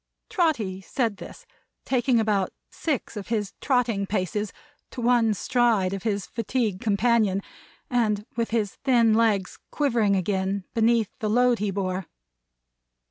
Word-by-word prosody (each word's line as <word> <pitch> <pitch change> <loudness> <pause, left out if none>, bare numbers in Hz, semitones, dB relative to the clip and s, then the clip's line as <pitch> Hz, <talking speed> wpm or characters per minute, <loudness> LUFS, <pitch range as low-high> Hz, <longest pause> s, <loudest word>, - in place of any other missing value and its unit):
Trotty 275 - 0
said 225 +1 -1
this, - - -11 0.4
taking 255 -2 +2
about 210 -3 +1 0.2
six 285 -7 -3
of 205 -2 -6
his 215 -4 -2
trotting 235 -7 +1
paces 205 +1 -2 0.4
to - - -9
one 235 -2 +3
stride 225 -5 +2
of 195 - -4
his 205 -2 -1
fatigued 230 -4 -2
companion; 215 -2 +2 0.5
and 215 -4 0
with 230 -1 -1
his 220 -3 -1
thin 235 -4 +3
legs 215 -4 +1
quivering 230 -9 +1
again, 190 +1 -1
beneath 225 -2 +2
the 215 - -1
load 245 +1 +3
he 210 0 0
bore. 190 -2 -2
220 Hz, 135 wpm, -25 LUFS, 200-240 Hz, 0.5 s, one